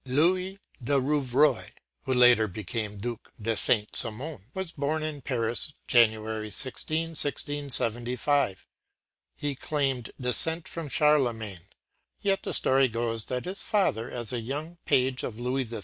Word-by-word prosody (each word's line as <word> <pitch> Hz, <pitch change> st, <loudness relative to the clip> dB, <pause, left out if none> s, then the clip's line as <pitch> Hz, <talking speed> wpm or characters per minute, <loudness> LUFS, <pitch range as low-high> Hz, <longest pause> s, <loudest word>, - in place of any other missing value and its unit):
” -, -, -41 dB
Louis 185 Hz, +4 st, +2 dB, 0.3 s
de 140 Hz, +3 st, +2 dB
Rouvroy, 140 Hz, -1 st, +1 dB, 0.3 s
who 130 Hz, -, 0 dB
later 125 Hz, -3 st, +6 dB
became 105 Hz, +2 st, -4 dB
the 100 Hz, -, -11 dB
Duc 120 Hz, 0 st, -6 dB
de 110 Hz, +1 st, -1 dB
Saint 105 Hz, 0 st, +2 dB
Simon, 115 Hz, -, 0 dB
was 190 Hz, -3 st, -4 dB
born 155 Hz, +1 st, -2 dB
in 155 Hz, -2 st, -4 dB
Paris, 120 Hz, +3 st, -2 dB
January 110 Hz, -2 st, +2 dB
16, 155 Hz, -, 0 dB
1675. 140 Hz, -, 0 dB, 0.7 s
He 145 Hz, -1 st, -3 dB
claimed 135 Hz, -3 st, -2 dB
descent 160 Hz, +6 st, +4 dB
from 165 Hz, -3 st, -6 dB
Charlemagne, 120 Hz, -, +1 dB, 0.6 s
but 195 Hz, -1 st, +1 dB
the -, -, -5 dB
story 135 Hz, 0 st, +3 dB
goes 115 Hz, -1 st, -2 dB
that 125 Hz, -1 st, -4 dB
his 190 Hz, +2 st, +3 dB
father, 120 Hz, -, 0 dB
as 120 Hz, -1 st, -3 dB
a 120 Hz, -, -1 dB
young 150 Hz, +8 st, -6 dB
page 130 Hz, 0 st, +2 dB
of 115 Hz, -1 st, -6 dB
Louis 125 Hz, +1 st, -1 dB
XIII. 115 Hz, -1 st, -5 dB
130 Hz, 145 wpm, -27 LUFS, 115-150 Hz, 0.7 s, later